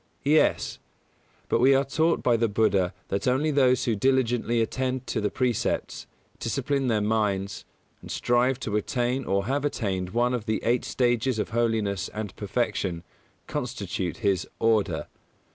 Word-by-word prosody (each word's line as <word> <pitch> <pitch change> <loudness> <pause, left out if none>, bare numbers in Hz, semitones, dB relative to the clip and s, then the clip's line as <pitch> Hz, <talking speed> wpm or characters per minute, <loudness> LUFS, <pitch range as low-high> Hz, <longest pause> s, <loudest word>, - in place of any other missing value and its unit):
Yes; 155 +2 +2 0.7
but - - +1
we 135 +3 +6
are 135 +1 +2
taught 160 +5 +1
by 120 - +4
the 115 0 +2
Buddha 100 -4 +2 0.2
that 100 - -1
only 135 +5 +2
those 130 -3 +3
who 115 - +1
diligently 120 0 +1
attend 130 +2 -1
to 110 - -2
the 105 - +1
Precepts, 125 -2 -1 0.3
discipline 135 +3 -1
their 110 -3 +2
minds, 105 -3 -1 0.4
and - - -11
strive 125 +2 +1
to 105 -6 -2
attain 125 +3 -1
or 100 0 0
have 140 +4 -1
attained 95 -10 -2
one 120 +4 +1
of 120 -4 -3
the 110 - 0
eight 120 +1 +1
stages 120 -1 +1
of 105 - -2
holiness 110 -5 0
and 105 -2 -5
perfection, 105 -5 -2 0.4
constitute 100 -7 -3
his 95 -3 +1
"Order". 115 -2 +1
115 Hz, 150 wpm, -26 LUFS, 105-130 Hz, 0.7 s, we